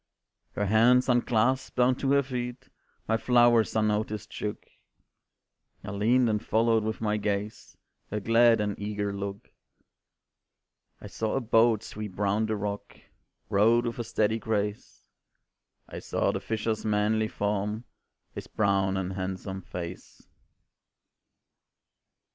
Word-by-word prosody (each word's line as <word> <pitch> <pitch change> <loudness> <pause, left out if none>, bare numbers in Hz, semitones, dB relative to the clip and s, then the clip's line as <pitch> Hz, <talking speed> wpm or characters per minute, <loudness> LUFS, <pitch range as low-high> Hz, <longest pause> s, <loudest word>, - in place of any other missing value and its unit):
Her 105 - -1
hands 115 +5 +4
unclasped, 125 +1 +1
down 125 +1 +4
to 135 - 0
her 140 0 +4
feet 125 -2 -5 0.4
My 110 - +2
flowers 120 -2 +3
unnoticed 110 0 -1
shook; 105 -1 -5 1.2
I 105 - -6
leaned 115 +5 +2
and 105 -2 0
followed 115 0 +2
with 110 +1 -3
my 105 -1 0
gaze 105 0 -4 0.3
Her 105 - -2
glad 115 +2 +4
and 105 -1 -2
eager 105 -1 -3
look. 100 0 -6 1.5
I - - -12
saw 110 -1 -3
a - - +2
boat 115 -2 +3
sweep 105 -4 -7
round 105 +2 +1
the 110 - -1
rock, 100 0 -5 0.5
Rowed 115 +4 +3
with 120 0 -4
a - - -1
steady 110 0 0
grace; 105 -2 -3 0.8
I - - -7
saw - - 0
the - - -3
fisher's 110 0 -2
manly 110 +1 +1
form, 105 +2 -2 0.5
His - - -7
brown 95 -2 +1
and 95 0 -3
handsome 95 0 -5
face. 90 0 -8
110 Hz, 125 wpm, -27 LUFS, 100-115 Hz, 1.5 s, hands